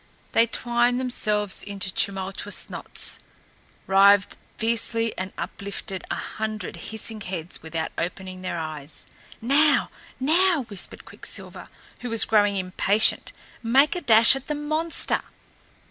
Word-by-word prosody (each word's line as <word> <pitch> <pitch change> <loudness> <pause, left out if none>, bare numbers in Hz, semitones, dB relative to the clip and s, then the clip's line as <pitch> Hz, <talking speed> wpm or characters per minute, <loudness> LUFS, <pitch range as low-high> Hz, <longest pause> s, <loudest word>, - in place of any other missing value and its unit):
They 230 - +4
twined 240 +1 +1
themselves 210 -5 -1
into 195 -2 -5
tumultuous 195 +1 -1
knots, - - -3 0.7
writhed 200 +1 +4 0.2
fiercely 230 0 0
and 185 +1 -5
uplifted 195 -2 -6
a - - -2
hundred 215 -1 -5
hissing 220 0 -2
heads 180 -3 -5
without 160 0 -4
opening 185 +1 -5
their 185 -2 -4
eyes. 155 -2 -7 0.4
"Now, 285 +5 +4 0.3
now!" 325 +3 +3
whispered 200 -4 -2
Quicksilver, - - -3 0.3
who 250 - -6
was 230 -1 +5
growing 205 -2 +2
impatient. 190 +3 +2 0.3
"Make 265 +7 +3
a 355 - -3
dash 225 -1 +7
at 270 0 -7
the 300 - -2
monster!" 310 +3 -1
215 Hz, 120 wpm, -24 LUFS, 190-245 Hz, 0.7 s, dash